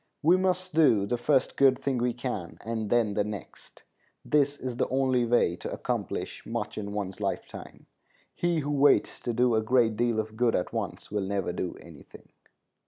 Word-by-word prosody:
We 170 +4 +6
must 185 -1 0
do 130 -11 +4
the 120 +4 -2
first 135 +2 +2
good 135 -2 +5
thing 130 -2 -1
we 120 +1 +1
can, 120 -8 -5
and 110 -2 -3
then 115 -3 +2
the 105 - +1
next. 105 -2 -9 0.4
This 145 -1 +2
is 125 -2 -5
the - - +1
only 130 -2 +1
way 115 -7 +2
to - - -6
accomplish - - -4
much 110 -2 -4
in 100 -1 -5
one's 100 -2 -4
lifetime. - - -5 0.5
He 175 -2 0
who 145 +1 -3
waits 145 0 +3
to 120 - -3
do 120 +1 +2
a 110 - +3
great 115 -1 +2
deal 120 -1 +1
of 110 0 -4
good 115 0 +2
at 90 - -2
once - - -4
will 105 -1 -1
never 95 -3 -1
do 90 - -4
any 80 -4 -13
thing. - - -16
120 Hz, 190 wpm, -28 LUFS, 105-135 Hz, 0.5 s, We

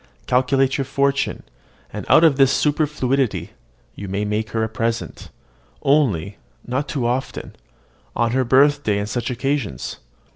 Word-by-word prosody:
Calculate 130 +2 +2
your 135 - 0
fortune; 140 +1 0 0.5
and - - -6
out 160 - +6
of 160 -4 +5
the 135 -1 +6
superfluity 140 -4 0 0.4
you 100 - -8
may 100 +2 -2
make 105 +1 -2
her 110 +2 -1
a - - 0
present, 115 +1 -3 0.5
only 105 - +1 0.3
not 130 +4 -2
too 135 -5 -2
often, 125 +3 -3 0.6
on 115 -1 +1
her 130 +1 +2
birthday, 135 -3 +3
and 100 0 -2
such 120 +2 -3
occasions." 125 - -3
130 Hz, 140 wpm, -21 LUFS, 110-140 Hz, 0.6 s, out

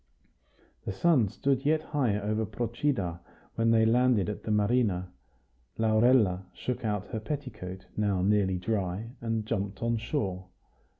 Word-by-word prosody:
The - - -3
sun 130 - +3
stood 135 +5 0
yet 155 +1 +2
high 125 -9 0
over 110 +2 -1
Procida 110 - -2 0.3
when 115 0 +1
they 110 -1 +5
landed 120 -3 +3
at 105 - -5
the - - -6
marina. 105 -4 +1 0.7
Laurella 110 -4 +3
shook 120 +9 -4
out 105 -2 -1
her 110 - -3
petticoat, 105 -8 -6
now 100 -3 +1
nearly 100 -2 +2
dry, 100 +2 -2
and 115 -2 -1
jumped 100 -2 -3
on 115 0 +1
shore. 100 -6 -3
110 Hz, 135 wpm, -29 LUFS, 95-120 Hz, 0.7 s, they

